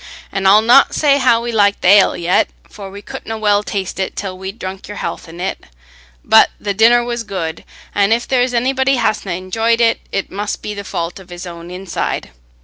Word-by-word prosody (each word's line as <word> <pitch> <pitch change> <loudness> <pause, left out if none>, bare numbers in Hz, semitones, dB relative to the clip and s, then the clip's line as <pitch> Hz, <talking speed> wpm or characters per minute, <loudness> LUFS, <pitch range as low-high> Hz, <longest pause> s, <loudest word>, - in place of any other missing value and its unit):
An' 195 -1 0
I'll 210 +3 +6
not 245 +4 +5
say 285 -2 +3
how 235 -3 +3
we 240 - -3
like 205 -2 +2
th' - - -6
ale 195 +2 +5
yet, 175 +1 +1 0.2
for 200 -2 -10
we 200 +1 -11
couldna 265 -4 -7
well 205 -1 +2
taste 195 -2 -4
it 190 - -3
till 190 -2 -5
we'd 190 +3 -7
drunk 190 -2 -7
your 205 - -8
health - - -5
in 170 +1 -11
it; 190 +2 -4 0.6
but - - +6
the 205 -1 -2
dinner 235 +4 +5
was 240 0 -3
good, 170 -6 -5 0.3
an' 200 +1 +2
if 235 +1 +1
there's 250 -1 +1
anybody 265 +2 +1
hasna 215 -6 -1
enjoyed 225 +6 0
it, 230 -1 +3
it 195 - -3
must 205 +1 -4
be 210 - -4
the 200 -1 -6
fault 170 -1 -4
of 190 -1 -15
his 175 +1 -8
own 170 -1 -9
inside. 180 - -4
205 Hz, 210 wpm, -17 LUFS, 190-230 Hz, 0.6 s, I'll